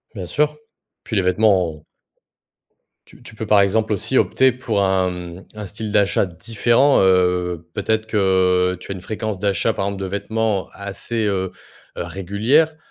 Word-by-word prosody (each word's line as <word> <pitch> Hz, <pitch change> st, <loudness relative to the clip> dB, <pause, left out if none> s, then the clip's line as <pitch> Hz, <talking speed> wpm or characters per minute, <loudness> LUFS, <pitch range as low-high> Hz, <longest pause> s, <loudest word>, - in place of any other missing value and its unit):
Bien 95 Hz, -3 st, -5 dB
sûr, 150 Hz, -, 0 dB, 0.5 s
puis 110 Hz, -, -5 dB
les 100 Hz, -, +3 dB
vêtements, 90 Hz, -1 st, +2 dB
heu 75 Hz, -, -16 dB, 1.3 s
tu -, -, -17 dB
tu 110 Hz, -, -12 dB
peux, 110 Hz, -, -5 dB
par 105 Hz, -1 st, +5 dB
exemple, 110 Hz, +2 st, +1 dB
aussi 120 Hz, +6 st, 0 dB
opter 130 Hz, 0 st, +3 dB
pour 115 Hz, -5 st, -1 dB
un, 95 Hz, -1 st, +2 dB
mmh, 90 Hz, 0 st, -8 dB
un 105 Hz, -1 st, -6 dB
style 105 Hz, +3 st, -6 dB
d'achat 100 Hz, -1 st, +2 dB
différent, 115 Hz, -, +2 dB
heu. 90 Hz, -2 st, +2 dB
Peut-être 110 Hz, +1 st, -1 dB
que 95 Hz, -3 st, +2 dB
tu 90 Hz, -, -9 dB
as -, -, -3 dB
une 90 Hz, -, -9 dB
fréquence 110 Hz, 0 st, -4 dB
d'achat, 100 Hz, +2 st, +1 dB
par 95 Hz, -, -2 dB
exemple, 100 Hz, -1 st, -4 dB
de -, -, -2 dB
vêtements 105 Hz, +1 st, -2 dB
assez, 100 Hz, +3 st, -4 dB
heu 95 Hz, -2 st, -1 dB, 0.5 s
heu -, -, -2 dB
régulière. 110 Hz, -, +1 dB
100 Hz, 165 wpm, -20 LUFS, 95-110 Hz, 1.3 s, par